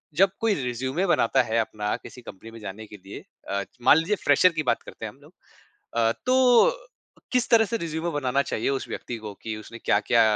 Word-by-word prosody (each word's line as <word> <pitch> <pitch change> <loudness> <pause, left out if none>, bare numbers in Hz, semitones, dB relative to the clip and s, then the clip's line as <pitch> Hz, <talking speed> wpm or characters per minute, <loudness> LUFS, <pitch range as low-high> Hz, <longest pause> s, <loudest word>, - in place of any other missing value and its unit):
जब 195 +4 +5
कोई 225 -2 +2
रिज़्यूमे 130 +8 -2
बनाता 135 -5 +3
है 115 -1 -1
अपना 105 -2 -2
किसी 125 - -11
कंपनी 115 0 -11
में 115 - -11
जाने 105 +1 -8
के 105 - -11
लिए 100 - -9 0.3
अ, 100 0 -1 0.2
मान 145 - +6
लीजिए 165 +6 +1
फ्रेशर 185 - +6
की - - +1
बात - - -2
करते - - -9
हैं - - -5
हम - - -24
लोग - - -18 0.6
अ, 115 -1 +3
तो 255 - +5 0.6
किस 250 -2 +2
तरह 230 -2 +6
से 230 +2 -2
रिज़्यूमे 165 -2 -3
बनाना 140 -2 0
चाहिए 110 - -1
उस 135 -1 -1
व्यक्ति 120 - -5
को 105 -1 -7
कि 110 -1 -4
उसने 110 +2 -10
क्या-क्या 115 +2 +3
125 Hz, 210 wpm, -25 LUFS, 110-175 Hz, 0.6 s, मान